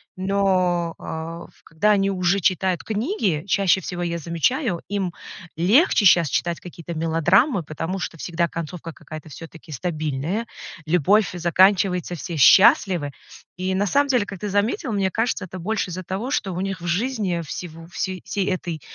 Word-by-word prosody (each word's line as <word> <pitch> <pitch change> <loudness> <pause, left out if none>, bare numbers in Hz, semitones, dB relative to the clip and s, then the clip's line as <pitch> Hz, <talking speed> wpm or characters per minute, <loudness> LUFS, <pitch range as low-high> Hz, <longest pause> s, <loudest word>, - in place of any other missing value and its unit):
но, 185 -3 +1
а, 165 +1 -6
ф - - -26
когда 165 +7 +1
они 195 -1 +2
уже 185 0 +1
читают 185 0 +1
книги, 215 - -1
чаще 190 -1 +3
всего 175 +1 -4
я 170 0 -2
замечаю, 170 - -1
им 195 -3 -2 0.5
легче 210 - +4
сейчас 170 -4 +6
читать 170 +5 -1
какие-то 170 -1 -8
мелодрамы, 170 - +2
потому 165 +5 -4
что 165 - -5
всегда 170 +1 -1
концовка 165 0 -6
какая-то 155 0 -10
всё-таки 165 +2 -11
стабильная, 155 - -2 0.4
любовь 180 +5 +3
заканчивается, 180 +1 +2
все 170 0 -6
счастливы. 190 - +5 0.5
И 185 +1 -1
на 200 +2 +1
самом 285 +7 +2
деле, 245 -6 +2
как 195 - -8
ты 210 - -4
заметил, 225 - 0
мне 195 -2 +1
кажется, 225 -1 -1
это 185 +1 -9
больше 210 +2 -2
из-за 185 +1 -5
того, 195 +8 -4
что 195 -9 -1
у 180 - -3
них 190 -2 -3
в - - -7
жизни 200 -2 -1
всего 165 +1 -8
всей 185 +1 -4
всей 200 -2 -2
этой, 175 -4 -3
180 Hz, 160 wpm, -22 LUFS, 165-200 Hz, 0.5 s, сейчас